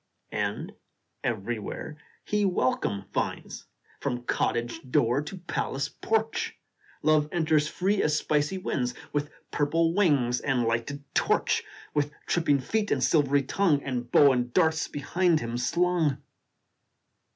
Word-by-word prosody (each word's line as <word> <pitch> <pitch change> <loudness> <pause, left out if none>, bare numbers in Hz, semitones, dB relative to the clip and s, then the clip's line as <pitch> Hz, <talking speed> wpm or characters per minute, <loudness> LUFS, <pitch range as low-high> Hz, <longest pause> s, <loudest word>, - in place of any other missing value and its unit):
And - - -2 0.5
everywhere 115 +6 -3 0.3
he 210 0 +1
welcome 130 - 0
finds, - - -3 0.3
From 125 -3 -2
cottage 120 +2 -1
door 125 +2 +3
to 150 +6 -7
palace 155 -5 -2
porch 225 0 -1 0.5
Love 155 -1 +3
enters 155 -3 +2
free 195 +5 0
as 150 0 +2
spicy 150 +4 0
winds, 125 -9 -2 0.2
With 145 0 -1 0.2
purple 165 +3 +2
wings 140 -11 +3
and 130 -3 +1
lighted 115 +5 -2
torch, - - +2 0.3
With 145 -1 +1 0.2
tripping 145 -5 +2
feet 215 +10 -1
and 130 - +1
silvery 145 -3 +3
tongue, 150 0 +2
And 125 -3 -4
bow 145 -2 +7
and 125 -1 0
darts 160 +1 +2
behind 165 +3 +1
him 115 -2 -4
slung. 165 +2 +1
145 Hz, 125 wpm, -27 LUFS, 125-170 Hz, 0.5 s, bow